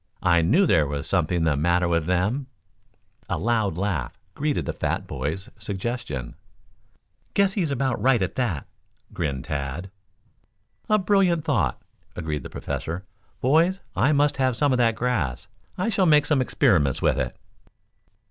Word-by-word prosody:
I 85 -2 +4
knew 155 - +4
there 80 - +3
was 70 0 -4
something 85 -2 +1
the 80 -3 +2
matter 85 +4 +2
with 85 -2 0
them." 100 +10 0 0.8
A - - 0
loud 110 -6 0
laugh 90 -10 -2 0.2
greeted 150 0 -1
the - - -2
fat - - -2
boy's 80 - -4
suggestion. 100 - -4 1.0
"Guess 200 -1 +3
he's 180 -7 0
about 135 -1 -1
right, 130 -2 +4
at 90 - -2
that," 115 - -1 0.5
grinned 70 -6 -2
Tad. 70 +7 -4 1.0
"A 215 - +5
brilliant 185 -5 +2
thought," 145 -7 +1 0.4
agreed 80 -4 -3
the - - -8
Professor. 85 +4 -5 0.4
"Boys, 165 +8 +3 0.2
I 125 +9 +3
must 145 -1 +2
have 130 -3 +1
some 145 0 +2
of 130 - +2
that 115 -2 +3
grass. 100 - -1 0.3
I 185 +5 0
shall 195 -4 +2
make 150 -2 +5
some 145 -4 +2
experiments 75 - +2
with - - +2
it." - - -3
105 Hz, 150 wpm, -24 LUFS, -, 1.0 s, A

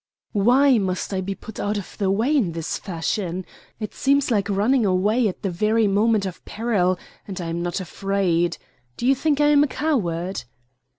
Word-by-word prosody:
"Why 245 +5 +4
must 190 0 -2
I 190 - 0
be 195 +1 -3
put 220 +1 -10
out 205 +1 -1
of 200 - -7
the 195 -2 +1
way 225 +10 +2
in 200 - +1
this 165 -1 -3
fashion? 180 0 -3 0.3
It 215 -2 -5
seems 280 -1 +2
like 205 -2 +1
running 220 +6 +2
away 210 +5 +2
at 185 - -5
the 195 - -1
very 215 +5 +2
moment 210 +1 +2
of 185 -3 -6
peril, 205 -5 0 0.3
and 195 -2 -6
I 170 -2 -4
am 170 +1 -2
not 175 +2 -2
afraid. 180 -2 0 0.4
Do - - -3
you 265 - +5
think 290 +2 0
I 295 0 +4
am 290 -1 +6
a - - +2
coward?" 190 - -1
200 Hz, 190 wpm, -23 LUFS, 185-235 Hz, 0.4 s, am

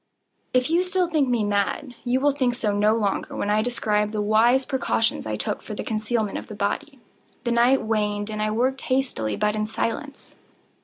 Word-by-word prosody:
If 255 0 +3 0.2
still 365 0 +1
you 345 - -9
think 295 -5 +2
me 240 -3 +1
mad, 205 +6 -1
you 250 +1 +1
will 290 +2 +3
think 255 -3 0
so 215 -4 -1
no 210 +2 +3
longer 205 -3 -1
when 205 - -1
I 215 +1 +3
describe 210 -3 0
the 215 - -2
wise 225 +5 +3
precautions 235 - 0
I 110 - -2
took 105 - -2
for 210 - -7
the - - -4
concealment 215 -1 -1
of - - -11
the 210 - -8
body. 270 +8 -2 0.5
The 240 - -1
night 240 +3 +4
waned, 210 -1 -1
and 215 0 -3
I 215 - +1
worked 255 +5 0
hastily, 255 - -1
but 210 - 0
in 215 0 -1
silence. 265 +6 -4
225 Hz, 200 wpm, -24 LUFS, 210-260 Hz, 0.5 s, night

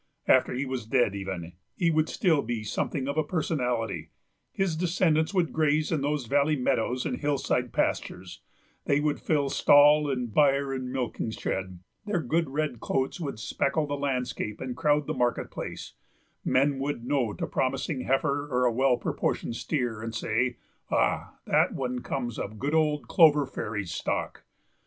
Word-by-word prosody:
After 130 - +5
he 135 +3 -1
was 130 -4 -4
dead, 120 -4 +2
even, 95 -4 -5 0.2
he 170 -2 +2
would 155 0 +1
still 170 - +2
be 115 -2 -3
something 130 +5 -2
of 140 +2 0
a - - +2
personality; 125 - -2 0.4
his 195 -4 0
descendants 165 -2 +2
would 180 -4 0
graze 155 -1 +2
in 155 -4 +1
those 145 -2 -1
valley 145 +5 +2
meadows 125 -2 0
and - - -2
hillside 135 -4 0
pastures, 90 0 -2 0.4
they 140 -1 +3
would 150 -1 0
fill 145 -3 +1
stall 145 +1 +6
and 125 -5 -2
byre 140 -2 +3
and 130 -1 -4
milking 125 -3 -2
shed, 95 -4 -4 0.3
their 205 -4 +1
good 165 +2 0
red 145 -3 -2
coats 135 +8 -1
would 140 -8 -4
speckle 140 +7 0
the 145 - -4
landscape 130 -6 -2
and 130 -2 -4
crowd 150 +2 +2
the - - -2
market 120 -1 0
place; - - -6 0.5
men 135 +1 +2
would 135 -4 -3
note 125 -5 0
a - - 0
promising 135 +2 -1
heifer 140 +2 0
or 125 0 +2
a 120 - +3
well 130 +1 +3
proportioned 115 - -2
steer, 120 -6 -2
and 115 0 -5
say: 120 +3 0 0.3
"Ah, - - 0
that - - +2
one 125 -2 -2
comes 120 -2 -4
of 105 +2 -5
good 140 +7 -2
old 150 -2 +1
Clover 150 -4 +5
Fairy's 105 -8 -4
stock." - - -3
135 Hz, 165 wpm, -27 LUFS, 120-150 Hz, 0.5 s, stall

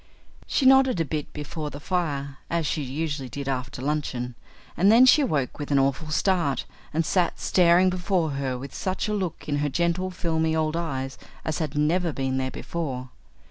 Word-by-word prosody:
She 275 - +1
nodded 265 -5 +6
a 165 - +1
bit 150 0 -4
before 150 +1 -5
the 145 - -8
fire, 140 -5 -2
as 170 -1 0
she 150 +2 -1
usually 145 0 -3
did 140 +1 -6
after 130 -1 -3
luncheon, 135 -4 -2 0.4
and 195 +4 +5
then 240 +3 +8
she 295 +4 +7
awoke 150 - -1
with 145 - -4
an 140 - +3
awful 140 +3 +1
start 170 -3 +1 0.3
and 160 +2 0
sat 180 0 +1
staring 180 +1 +4
before 180 -3 0
her 135 -2 -2
with 135 +1 -8
such 185 +2 -2
a 210 - -1
look 190 -6 -3
in 145 -1 0
her 145 0 0
gentle, 170 +5 0
filmy 160 -3 0
old 155 0 0
eyes 135 -6 -3 0.3
as 160 - -1
had 155 -3 -3
never 165 +3 +2
been 135 -2 -1
there 130 0 -1
before. 130 -5 -5
155 Hz, 185 wpm, -25 LUFS, 140-175 Hz, 0.4 s, then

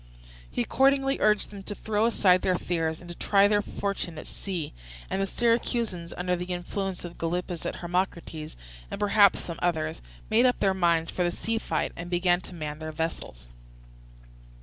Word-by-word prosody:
He 120 - -1
accordingly 270 - +3
urged 210 -1 +2
them 200 -1 -8
to 205 +1 -6
throw 215 +1 +1
aside 185 -5 +4
their 185 - +2
fears 165 -2 -1
and 175 - -11
to - - -7
try 200 +2 +4
their 205 0 +3
fortune 200 -5 -3
at - - -7
sea; 180 -6 -5 0.4
and 190 - 0
the 195 - +1
Syracusans, 230 -6 0
under 180 0 0
the 175 0 -4
influence 180 +1 -3
of 170 - -9
Gylippus 175 +1 -2
and - - -3
Hermocrates, 170 -3 -3 0.3
and - - -5
perhaps 205 -1 +5
some 170 -2 -6
others, 160 -2 0 0.3
made 235 +4 +5
up 250 - +1
their 195 -1 +3
minds 170 -3 +2
for 180 - 0
the 175 - +2
sea 225 +6 -2
fight 160 -7 -1
and 170 +1 -6
began 175 0 +2
to 180 - -10
man 150 -2 -5
their 155 0 -5
vessels. 155 - -4
180 Hz, 180 wpm, -27 LUFS, 170-205 Hz, 0.4 s, perhaps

